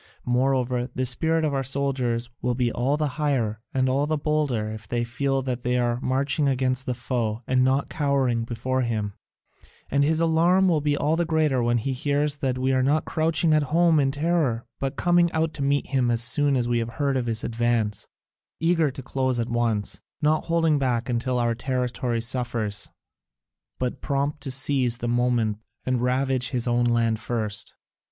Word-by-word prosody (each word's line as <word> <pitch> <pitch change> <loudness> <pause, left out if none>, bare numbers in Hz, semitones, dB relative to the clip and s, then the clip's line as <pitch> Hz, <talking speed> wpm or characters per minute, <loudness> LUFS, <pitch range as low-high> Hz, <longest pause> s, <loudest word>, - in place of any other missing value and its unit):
Moreover, 125 0 +1
the 130 -1 -3
spirit 160 +5 +1
of 150 - 0
our 135 - 0
soldiers 130 -3 -1
will 125 -1 0
be 125 -1 +1
all 130 +6 0
the 150 0 0
higher 115 -8 0
and 130 -1 +1
all 140 +3 +1
the 155 0 0
bolder 145 -7 0
if 110 0 -9
they 120 -1 -1
feel 135 +3 -1
that 125 -2 -3
they 125 +1 0
are 120 -1 0
marching 140 +3 0
against 130 -1 0
the 125 - -1
foe 115 -2 -2
and 130 0 +2
not 135 +2 +2
cowering 135 -6 0
before 125 +3 -2
him; 110 -4 -2 0.8
and 140 +1 +3
his 160 +2 +2
alarm 170 +3 +3
will 165 -4 +2
be 145 0 +1
all 150 +3 +1
the 170 - +1
greater 155 -5 +1
when 120 0 +2
he 130 +4 -2
hears 145 +3 0
that 130 -2 -1
we 130 +1 +1
are 130 - +2
not 145 +4 +2
crouching 160 0 +1
at 155 - +4
home 165 0 +4
in 135 -1 +2
terror 145 -5 0
but 135 +1 -2
coming 175 +1 +3
out 160 0 0
to 150 - -6
meet 140 0 +1
him 130 -3 +1
as 115 0 +1
soon 140 +4 +3
as 120 -2 0
we 120 -1 +1
have 115 0 -4
heard 140 -3 0
of 125 -2 -1
his 115 -1 -1
advance, 115 -3 -1 0.5
eager 165 -2 +2
to 135 0 -8
close 130 -1 -1
at 115 - -2
once, 115 -3 -1 0.2
not 155 +1 +1
holding 165 -3 +2
back 125 -3 0
until 125 +1 0
our 120 -1 +1
territory 125 -1 -2
suffers, 115 -4 -2 0.9
but 125 +1 -3
prompt 140 +1 -1
to 140 - -4
seize 130 -2 0
the 120 - -4
moment 120 -3 +1 0.3
and 130 -2 0
ravage 130 0 0
his 125 -3 -1
own 120 0 +2
land 115 -2 +1
first. 110 -3 -2
130 Hz, 190 wpm, -25 LUFS, 120-145 Hz, 0.9 s, at